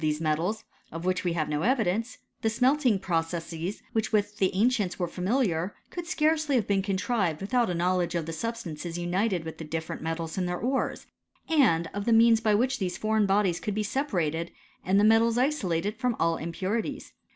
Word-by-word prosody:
these 155 Hz, -1 st, 0 dB
metals, 165 Hz, +8 st, -1 dB, 0.3 s
of 165 Hz, +2 st, -6 dB
which 185 Hz, 0 st, 0 dB
we 175 Hz, -2 st, 0 dB
have 155 Hz, -2 st, -1 dB
no 150 Hz, 0 st, -1 dB
evidence, 230 Hz, 0 st, 0 dB, 0.2 s
tha 220 Hz, -, +2 dB
smelting 250 Hz, 0 st, +3 dB
processes 165 Hz, 0 st, -3 dB
with 220 Hz, -1 st, 0 dB
which 205 Hz, -1 st, 0 dB
the 190 Hz, -3 st, +3 dB
ancients 210 Hz, -3 st, +1 dB
were 175 Hz, -, -1 dB
fami 200 Hz, +10 st, 0 dB
liar, 170 Hz, +3 st, -2 dB, 0.2 s
could 350 Hz, -1 st, -6 dB
scarcely 310 Hz, -3 st, +1 dB
have 235 Hz, -, +2 dB
been 200 Hz, -1 st, +1 dB
contrived 190 Hz, -3 st, 0 dB
without 235 Hz, +3 st, +1 dB
a 180 Hz, -, -1 dB
knowledge 175 Hz, 0 st, 0 dB
of 170 Hz, -2 st, -1 dB
the 165 Hz, -, -5 dB
substances 175 Hz, -5 st, -4 dB
united 180 Hz, +1 st, 0 dB
with 160 Hz, 0 st, -8 dB
the -, -, -5 dB
different 160 Hz, +1 st, -5 dB
metals 165 Hz, +2 st, -3 dB
in 180 Hz, -, 0 dB
their 180 Hz, 0 st, -2 dB
ores, 260 Hz, +6 st, -1 dB, 0.4 s
and 220 Hz, -, +3 dB
of 205 Hz, 0 st, -3 dB
the 235 Hz, -, +2 dB
means 225 Hz, 0 st, +6 dB
by 215 Hz, -2 st, +3 dB
which 255 Hz, +4 st, +1 dB
these 180 Hz, -3 st, -2 dB
foreign 215 Hz, -1 st, +1 dB
bodies 195 Hz, -3 st, +2 dB
could 210 Hz, -, -3 dB
be 215 Hz, -, 0 dB
separated, 170 Hz, -, -1 dB, 0.3 s
and 190 Hz, +2 st, +3 dB
the -, -, +4 dB
metals 225 Hz, +2 st, +4 dB
isor 260 Hz, -6 st, +1 dB
lated 205 Hz, +5 st, -3 dB
from 250 Hz, 0 st, -1 dB
all 165 Hz, 0 st, +2 dB
impurities. 185 Hz, +7 st, -3 dB
195 Hz, 195 wpm, -27 LUFS, 170-230 Hz, 0.4 s, means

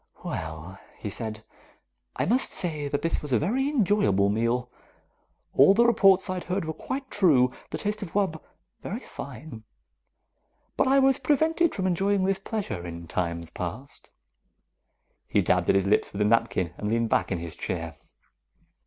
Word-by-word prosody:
"Well," 80 Hz, +4 st, -6 dB, 0.2 s
he 105 Hz, -, -5 dB
said. 110 Hz, 0 st, -5 dB, 0.7 s
"I -, -, 0 dB
must 245 Hz, +6 st, +1 dB
say 155 Hz, -5 st, -2 dB
that 145 Hz, 0 st, -2 dB
this 165 Hz, -, 0 dB
was 150 Hz, -, -6 dB
a 120 Hz, -, +4 dB
very 255 Hz, -, 0 dB
enjoyable 200 Hz, -, +2 dB
meal. 115 Hz, +3 st, 0 dB, 0.8 s
All 145 Hz, +9 st, +6 dB
the 235 Hz, +2 st, +5 dB
reports 195 Hz, -5 st, +5 dB
I 185 Hz, -, -2 dB
had 180 Hz, -, -5 dB
heard 180 Hz, -1 st, -2 dB
were 160 Hz, -, -3 dB
quite 265 Hz, -, -5 dB
true 140 Hz, -11 st, +4 dB, 0.2 s
the -, -, -4 dB
taste 210 Hz, +1 st, -3 dB
of 190 Hz, -5 st, -7 dB
wub. 190 Hz, -6 st, 0 dB, 0.4 s
Very 220 Hz, +6 st, -5 dB
fine. 130 Hz, -, -9 dB, 1.1 s
But -, -, +2 dB
I 270 Hz, +1 st, +4 dB
was 270 Hz, -1 st, +4 dB
prevented 315 Hz, +5 st, +2 dB
from 190 Hz, -, -2 dB
enjoying 195 Hz, +2 st, +1 dB
this 195 Hz, 0 st, +1 dB
pleasure 200 Hz, -, -4 dB
in 85 Hz, -1 st, -8 dB
times 85 Hz, -1 st, -3 dB
past." 110 Hz, +11 st, -7 dB, 1.2 s
He -, -, +2 dB
dabbed -, -, +1 dB
at -, -, +5 dB
his 95 Hz, -1 st, +2 dB
lips 100 Hz, -, +2 dB
with 100 Hz, -, -4 dB
his 105 Hz, -, +3 dB
napkin 115 Hz, -7 st, +1 dB
and 105 Hz, -, -2 dB
leaned 115 Hz, 0 st, +1 dB
back -, -, +1 dB
in 95 Hz, -, 0 dB
his 85 Hz, -1 st, -6 dB
chair. 80 Hz, -2 st, -4 dB
150 Hz, 170 wpm, -26 LUFS, -, 1.2 s, All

